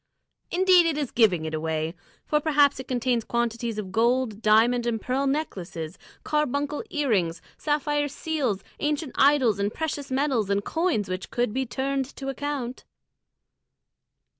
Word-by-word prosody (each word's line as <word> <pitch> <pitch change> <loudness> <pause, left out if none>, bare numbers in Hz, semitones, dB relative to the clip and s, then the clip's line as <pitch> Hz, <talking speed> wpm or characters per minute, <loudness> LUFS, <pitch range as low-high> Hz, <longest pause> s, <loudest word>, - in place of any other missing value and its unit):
Indeed, 365 -1 +5
it 315 -3 0
is 290 -4 -2
giving 190 -9 +3
it 155 - -4
away; 160 0 -2 0.3
for 300 - +2
perhaps 290 -3 +3
it 260 - -7
contains 245 -2 0
quantities 235 -1 -2
of 195 -3 -5
gold, 235 0 +1
diamond, 230 +3 +4
and 225 -2 0
pearl 260 +5 -1
necklaces, 180 - -3 0.2
carbuncle 295 - -1
earrings, 200 - 0 0.2
sapphire 295 -1 0
seals, 275 - -2 0.2
ancient 300 -1 -1
idols 265 -7 +4
in 200 0 +1
precious 290 +2 -4
metals, 260 -6 +1
and 200 0 0
coins 325 - 0
which 185 0 -4
could 240 -3 -1
be 265 +1 -1
turned 270 +2 -1
to 270 -1 -5
account." 270 -2 -4
255 Hz, 140 wpm, -26 LUFS, 215-290 Hz, 0.3 s, Indeed